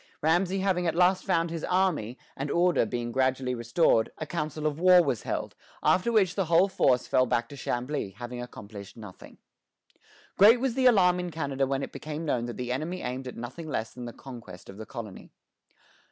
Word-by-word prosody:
Ramesay 180 +4 +2
having 180 -2 +1
at 165 - 0
last 180 +2 +3
found 165 0 +1
his 165 -2 -5
army, 175 - 0 0.2
and 140 +2 -4
order 175 -6 +2
being 120 +1 -3
gradually 130 0 0
restored, 115 0 +2
a 155 - -4
council 155 -1 -4
of 150 0 -1
war 180 0 +7
was 120 - -1
held, - - -4 0.3
after 190 +6 +3
which 195 -6 +3
the 195 - -1
whole 170 +4 +4
force 130 -9 +2
fell 130 0 +2
back 120 0 0
to 145 - -9
Chambly, 125 -1 -3
having 120 +1 -6
accomplished 105 -4 -10
nothing. 105 -5 -12 1.0
Great 220 +5 +8
was 260 -1 0
the 260 +1 +3
alarm 180 -6 +4
in 180 0 -3
Canada 140 -4 -2
when 135 0 -1
it - - -6
became 155 +1 -6
known 120 -6 0
that 120 - -6
the 125 -1 -4
enemy 160 +8 -3
aimed 130 +1 -4
at 125 - -8
nothing 155 +7 -7
less 110 -5 -3
than 125 -1 -8
the 120 - -6
conquest 115 -8 -11
of 95 - -10
the 110 -1 -8
colony. 110 -6 -8
145 Hz, 195 wpm, -27 LUFS, 120-180 Hz, 1.0 s, Great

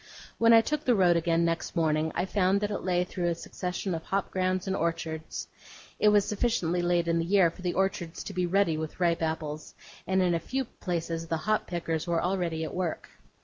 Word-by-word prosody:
When 230 0 +6
I 225 0 +8
took 300 +6 -2
the 250 -4 +3
road 180 -3 +4
again 170 0 +2
next 165 0 -2
morning, 160 -1 +1
I 175 - 0
found 190 0 +2
that 205 0 -1
it - - -2
lay 180 -1 +1
through 180 -1 -3
a 170 - +1
succession 180 +2 -4
of 165 - -3
hop 195 +3 -2
grounds 185 0 0
and 190 -1 -1
orchards. 165 -2 -3 0.5
It 210 - +5
was 205 -1 +4
sufficiently 195 -6 0
late 175 -1 +1
in 165 0 +2
the - - +1
year 185 -2 +4
for 180 - -14
the 180 -1 -2
orchards 190 -3 -1
to 200 - -7
be 180 -1 0
ruddy 180 -3 +2
with 160 +2 -5
ripe 170 -2 +2
apples; 155 -1 -3 0.3
and 190 0 +2
in 175 -1 +2
a 170 - +1
few 265 +10 -2
places 165 -5 -4
the 165 - -1
hop 215 +7 0
pickers 165 -1 -2
were 170 -1 +1
already 175 -3 -1
at 160 - -5
work. 180 -3 -3
175 Hz, 220 wpm, -28 LUFS, 165-195 Hz, 0.5 s, I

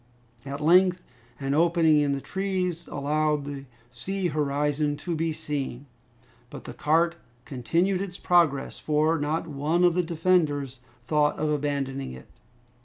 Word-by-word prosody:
At 140 +2 -5
length 180 +3 +4 0.4
an 135 0 -1
opening 165 -1 +4
in 145 -1 +1
the 140 - -3
trees 185 -2 -2
allowed 150 +1 0
the 140 -1 -6 0.3
sea 180 +10 -3
horizon 145 0 0
to 170 +1 -3
be 165 +1 -1
seen. 145 -4 -4 0.6
But - - -9
the - - -8
cart 165 +3 +1 0.3
continued 170 - 0
its 185 -2 -5
progress, 165 -6 +2
for 155 +1 +1
not 155 +3 -1
one 155 +4 0
of 175 -1 +4
its 180 -2 0
defenders 155 -6 +1 0.2
thought 150 +2 +1
of 155 0 0
abandoning 140 - -2
it. 65 0 -11
150 Hz, 140 wpm, -26 LUFS, 140-170 Hz, 0.6 s, length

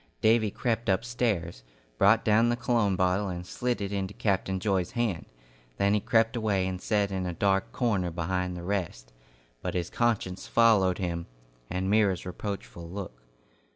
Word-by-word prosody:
Davy 110 -1 +3
crept 115 +1 -1
upstairs, 95 - -1 0.4
brought 110 +3 +5
down 115 +2 +4
the 120 - +2
cologne 115 -5 +1
bottle 95 +2 +1
and 90 -1 -5
slid 120 +4 -2
it 100 0 -3
into 100 0 -3
Captain 95 -2 0
Joy's 95 -2 0
hand; 115 -9 -1 0.5
then 100 +1 +2
he 105 - +3
crept 115 +3 +2
away 105 -5 +1
and 95 -1 -4
sat 100 -1 +1
in 95 -1 -2
a 90 - -4
dark 95 +1 +1
corner 100 -8 0
behind 90 +2 -2
the 85 - -7
rest, 85 -11 -3 0.5
but - - -3
his 90 -2 -2
conscience 110 -6 -1
followed 105 -6 +4
him, 85 -2 -3 0.4
and 95 +1 -2
Myra's 100 -3 +2
reproachful 85 - -6
look. 90 -10 -7
95 Hz, 160 wpm, -28 LUFS, 90-110 Hz, 0.5 s, brought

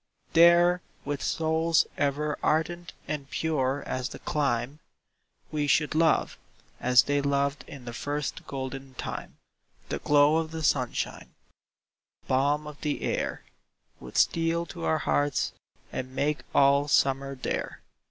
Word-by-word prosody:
There, 170 +1 +6 0.2
with 145 -2 -3
souls 160 0 +2
ever 145 +1 0
ardent 170 +2 0
and 140 -2 -4
pure 140 -4 -1
as 130 -1 -3
the - - -8
clime, 135 -1 -1 0.7
We 150 -1 -1
should 150 +1 +2
love, 160 0 +2 0.4
as 125 0 +5
they 145 0 +1
loved 140 0 0
in 135 -4 -10
the 120 - -6
first 145 +3 -4
golden 135 0 -6
time; - - -6 0.5
The - - -2
glow 145 +1 +4
of 160 -1 -1
the 160 0 -5
sunshine, 130 -5 -1 0.9
the - - -29
balm 145 +3 +2
of 150 -1 -10
the 150 -1 -2
air, - - -2 0.6
Would - - -8
steal 165 0 +2
to 170 -3 -5
our 160 - +2
hearts, 145 -1 0 0.4
and 130 0 -5
make 150 +2 0 0.2
all 140 +1 +5
summer 135 -1 +2
there. 130 - -4
145 Hz, 135 wpm, -27 LUFS, 135-160 Hz, 0.9 s, There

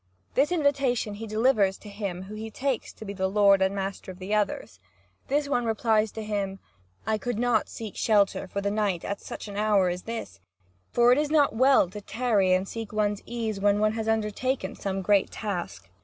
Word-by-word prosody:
This 285 +5 +2
invitation 275 -9 +1
he 220 +2 -7
delivers 215 -3 +2
to - - -14
him 200 -3 -5
whom 210 +3 -8
he 220 +1 -5
takes 260 +2 -2
to 220 - -11
be 200 - -5
the 190 -1 0
lord 200 0 +4
and 190 +1 +2
master 195 -1 -4
of 180 - -12
the 190 +3 -4
others. 205 - -1 0.5
And 280 - +3
this 295 -1 -1
one 265 -4 +1
replies 220 -1 +1
to 220 - -5
him: 200 -2 -2 0.5
"I 220 0 0
could 245 -1 -3
not 240 -2 +1
seek 220 -3 -7
shelter 205 -4 +2
for 200 +2 -3
the 200 0 -1
night 205 -5 -1
at 200 - -4
such - - -7
an 200 -1 -7
hour 205 -3 +3
as 180 +1 -3
this; 225 - -6 0.5
for 240 0 +5
it 255 - +5
is 300 -1 0
not 295 -5 +3
well 260 -3 +5
to 210 +1 -7
tarry 210 -4 +1
and 185 +1 +2
seek 225 -1 -6
one's 210 -1 0
ease 225 -4 -3
when 200 0 +3
one 215 0 +3
has 220 0 -3
undertaken 225 +4 -1
some 195 -1 -3
great 200 0 +3
task. 175 - -5
210 Hz, 210 wpm, -27 LUFS, 195-230 Hz, 0.5 s, for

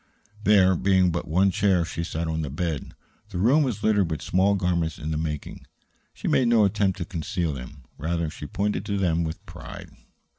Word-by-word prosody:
There 95 -3 +5
being 95 0 +3
but 85 - -3
one 95 +5 +3
chair, 90 -2 +2
she 85 0 -4
sat 85 -1 -3
on 80 0 -1
the 75 - -3
bed. 80 0 -3 0.3
The 95 - -5
room 125 - +4
was 120 -8 -1
littered 105 -5 +3
with 80 -3 -3
small 95 +3 +2
garments 85 -4 0
in 75 +1 -4
the - - -1
making. 75 -2 -5 0.4
She - - -6
made 125 - +3
no 115 -3 +5
attempt 100 -1 +1
to - - -3
conceal 85 -3 -2
them; 65 +1 -9 0.2
rather, 85 +1 -1
she 75 - -8
pointed 105 +5 -1
to 100 - -1
them 85 -3 +1
with 80 -1 -5
pride. - - -10
90 Hz, 195 wpm, -25 LUFS, 80-100 Hz, 0.4 s, There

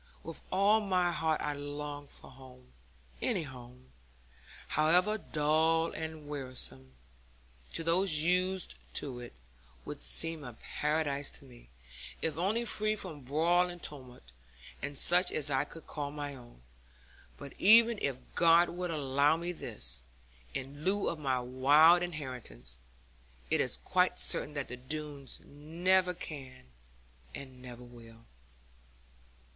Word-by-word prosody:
With 165 - -8
all 200 +3 +4
my 185 -3 +1
heart 160 -2 0
I 150 - -1
long 145 0 -6
for - - -13
home; 130 -1 -16 0.5
any - - 0
home, 125 -2 -12 0.8
however 180 +8 +3
dull 160 +1 +1
and 160 -2 -6
wearisome 125 - -3 0.8
to 165 - -3
those 165 -2 +4
used 185 +1 +1 0.2
to 130 -4 -1
it, 120 -1 -9 0.5
would - - -7
seem 105 - +2
a 125 -3 -8
paradise 145 +2 -1
to - - -9
me, 120 - -17 0.5
if 160 -2 -1
only 205 +8 0
free 215 -1 +1
from 170 -8 -5
brawl 170 +7 +2
and 175 -1 -9
tumult, 130 -4 -6 0.6
and 145 0 -3
such 180 +5 +6
as 145 -1 -1
I 135 +1 +1
could 165 +2 -13
call 145 -2 -4
my 145 -1 -5
own. 120 - -15 0.7
But 140 - -10
even 230 +2 +6
if 135 -3 -1 0.2
God 170 +1 +5
would 180 0 -4
allow 145 0 +2
me 170 +1 -3
this, 60 - -2 0.5
in 140 +3 -6
lieu 200 +3 +1
of 165 - -5
my 130 -3 0
wild 145 +7 +5
inheritance, 125 - -5 0.7
it - - +3
is - - 0
quite - - +1
certain 150 - +1
that 140 -2 -3
the 125 - -7
Doones 145 +1 -3
never 180 +5 +1
can 135 -7 -9 0.7
and 130 -2 -10
never 125 -1 -10
will.' 115 -2 -15
150 Hz, 135 wpm, -32 LUFS, 130-170 Hz, 0.8 s, such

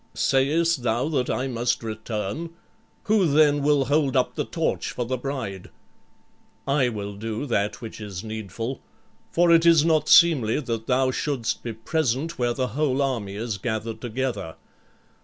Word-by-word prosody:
"Sayest 150 +3 +2
thou 120 +4 0
that 130 -5 0
I 130 - -1
must 120 -1 -1
return? 110 +7 -4 0.5
Who 210 -4 +3
then 145 -1 +4
will 145 -1 +3
hold 140 -1 +2
up 125 - +1
the - - -2
torch - - -2
for 120 - -3
the 130 +2 -1
bride?" 125 -8 -5 1.0
"I 135 -2 +2
will 105 -3 -5
do 110 +5 -4
that 115 0 -1
which 115 -1 -8
is 100 -2 -6
needful. 110 +3 -5 0.5
For 175 0 +3
it 165 0 +6
is 165 -2 +6
not 155 -2 +2
seemly 145 -10 +5
that 115 -5 -4
thou 130 0 +2
shouldst 130 -4 -2
be 115 - -5
present 140 +6 -1
where 120 -1 +1
the 130 -1 -1
whole 135 +2 0
army 120 -8 -1
is 110 -1 -4
gathered 110 +1 -3
together." 120 -8 -3
125 Hz, 160 wpm, -24 LUFS, 110-145 Hz, 1.0 s, it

